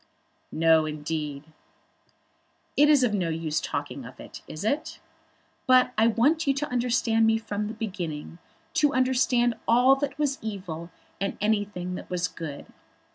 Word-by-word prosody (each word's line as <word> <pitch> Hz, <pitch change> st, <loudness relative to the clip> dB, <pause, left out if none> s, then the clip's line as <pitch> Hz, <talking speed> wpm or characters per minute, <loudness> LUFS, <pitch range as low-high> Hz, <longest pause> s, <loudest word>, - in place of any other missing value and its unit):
"No, 160 Hz, 0 st, +4 dB
indeed." 150 Hz, -1 st, -4 dB, 1.3 s
"It 295 Hz, +1 st, +5 dB
is 290 Hz, -4 st, +5 dB
of 235 Hz, -4 st, +2 dB
no 180 Hz, -5 st, 0 dB
use 160 Hz, -1 st, -1 dB
now -, -, -4 dB
talking -, -, -4 dB
of -, -, -12 dB
it; -, -, -10 dB
is 155 Hz, -, -7 dB
it? 285 Hz, +9 st, -2 dB, 0.7 s
But 255 Hz, -1 st, +5 dB
I 220 Hz, +1 st, +4 dB
want 285 Hz, +8 st, +2 dB
you 275 Hz, -, +3 dB
to 295 Hz, +2 st, -2 dB
understand 235 Hz, -2 st, +2 dB
me 225 Hz, 0 st, +3 dB
from 210 Hz, -2 st, -3 dB
the 220 Hz, -, -6 dB
beginning; 175 Hz, -7 st, -5 dB, 0.3 s
to 295 Hz, -1 st, +2 dB
understand 250 Hz, -2 st, +2 dB
all 250 Hz, +3 st, +6 dB
that 285 Hz, 0 st, -3 dB
was 285 Hz, -2 st, 0 dB
evil, 180 Hz, -6 st, -6 dB, 0.3 s
and 195 Hz, +1 st, -2 dB
anything 205 Hz, -4 st, -1 dB
that -, -, -7 dB
was 180 Hz, -1 st, 0 dB
good. 160 Hz, -3 st, -7 dB
215 Hz, 155 wpm, -26 LUFS, 165-250 Hz, 1.3 s, all